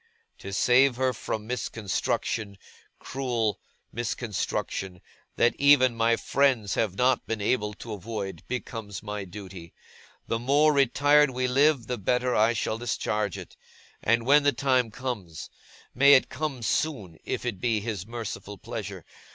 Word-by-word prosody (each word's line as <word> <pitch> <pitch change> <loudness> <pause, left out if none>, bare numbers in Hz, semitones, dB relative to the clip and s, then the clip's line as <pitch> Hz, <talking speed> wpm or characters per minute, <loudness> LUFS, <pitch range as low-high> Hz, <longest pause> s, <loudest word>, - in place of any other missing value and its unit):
To 100 - -8
save 125 +6 +4
her 130 0 +1
from 110 -1 -4
misconstruction, 110 -2 -2 0.4
cruel 120 -6 -2 0.3
misconstruction, 105 -5 -3 0.4
that 120 - +3
even 140 -3 +6
my 115 0 +3
friends 125 -7 +1
have 105 -5 0
not 125 +4 +2
been 115 -1 -2
able 105 0 0
to 110 +1 -8
avoid, 100 -3 -5
becomes 115 -6 -5
my 105 -1 -5
duty. 95 -3 -10 0.5
The 115 - -2
more 145 +5 +3
retired 145 +2 +4
we 130 0 -1
live, 140 0 +3
the 125 0 -4
better 125 +5 +1
I 110 +2 +4
shall 110 0 -2
discharge 105 -4 -2
it. - - -10 0.5
And 115 +1 +2
when 145 +3 +6
the 145 -1 +2
time 130 -2 +1
comes 110 -9 -6 0.4
may 140 +2 +7
it 130 - +3
come 135 -3 -4
soon, 105 - -2
if - - -4
it 110 -6 -3
be 115 -3 +1
His 105 -3 -5
merciful 110 -3 -6
pleasure! - - -7
115 Hz, 145 wpm, -27 LUFS, 105-130 Hz, 0.5 s, may